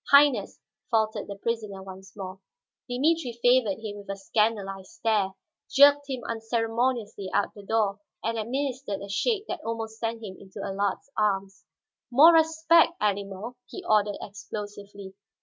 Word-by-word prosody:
"Highness," 280 -1 +5 0.3
faltered 220 -2 +1
the 200 - -6
prisoner 210 -2 -3
once 190 0 -11
more. 190 -1 -6 0.5
Dimitri 275 +1 +1
favored 245 -4 +4
him 205 -1 -5
with 200 -1 -12
a 195 - -2
scandalized 195 -2 -1
stare, 215 -4 +1 0.4
jerked 285 +1 +6
him 255 -2 -3
unceremoniously 225 -2 -1
out 205 - +1
the 205 - -11
door, 205 -1 0 0.2
and 230 +1 -1
administered 260 -1 -2
a 200 - -7
shake 420 - 0
that 355 -2 -4
almost 225 -1 -4
sent 230 0 -3
him 190 -3 -7
into 195 +1 -12
Allard's 200 +7 -2
arms. 195 -2 -1 0.4
"More 295 +7 +8
respect, 320 +1 +5
animal," 205 +3 -2
he 375 - -8
ordered 210 -1 +3
explosively. 205 -1 -8
220 Hz, 140 wpm, -27 LUFS, 200-250 Hz, 0.5 s, More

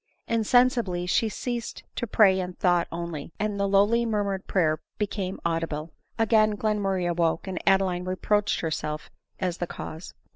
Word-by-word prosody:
Insensibly 230 -5 +2
she 220 +5 +2
ceased 240 +1 -4
to 240 - -2
pray 195 -3 +5
in 180 -1 -3
thought 175 -1 +2
only, 170 -3 -5
and 210 -1 -2
the 200 - +2
lowly 205 +4 +4
murmured 205 -4 -1
prayer 155 -5 +2 0.2
became 195 -2 -3
audible. 165 -2 -2 0.3
Again 215 -1 +3
Glen 210 0 0
murray 190 -3 0
awoke, 170 0 +1
and 190 -2 -4
Adeline 190 -2 +3
reproached 205 +3 0
herself 155 -1 -3 0.3
as 180 -2 -1
the 175 - -2
cause. 160 +1 -8
190 Hz, 150 wpm, -26 LUFS, 175-210 Hz, 0.3 s, pray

